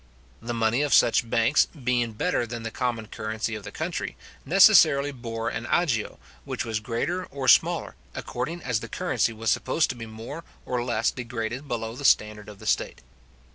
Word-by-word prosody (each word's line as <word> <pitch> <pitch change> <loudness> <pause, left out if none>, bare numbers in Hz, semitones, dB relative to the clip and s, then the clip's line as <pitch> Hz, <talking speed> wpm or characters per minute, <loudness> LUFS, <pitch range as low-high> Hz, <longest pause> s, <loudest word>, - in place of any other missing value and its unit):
The 120 +1 -4
money 115 +3 +1
of 145 -1 +3
such 115 0 +4
banks, 115 +5 +3
being 125 -5 -1
better 120 0 0
than 115 0 -6
the 115 - -4
common 120 -3 -2
currency 110 +1 -4
of 105 -1 -6
the 100 - -8
country, - - -4 0.3
necessarily 140 +1 +6
bore 115 -3 -4
an 115 - -5
agio, 140 -12 0 0.3
which - - -4
was 110 -2 -2
greater 125 +12 -2
or 135 -1 -5
smaller, - - +4 0.2
according 170 +4 -4
as 125 -4 0
the - - -8
currency - - 0
was 110 0 -1
supposed 155 +5 +1
to - - -8
be 115 -1 -8
more 115 +9 -8 0.2
or 125 -1 -1
less 115 -2 +1
degraded 120 +2 -5
below 115 -2 -3
the 145 - -8
standard 105 -5 +2
of 105 - -11
the - - -13
state. - - -1
115 Hz, 180 wpm, -26 LUFS, 110-130 Hz, 0.3 s, necessarily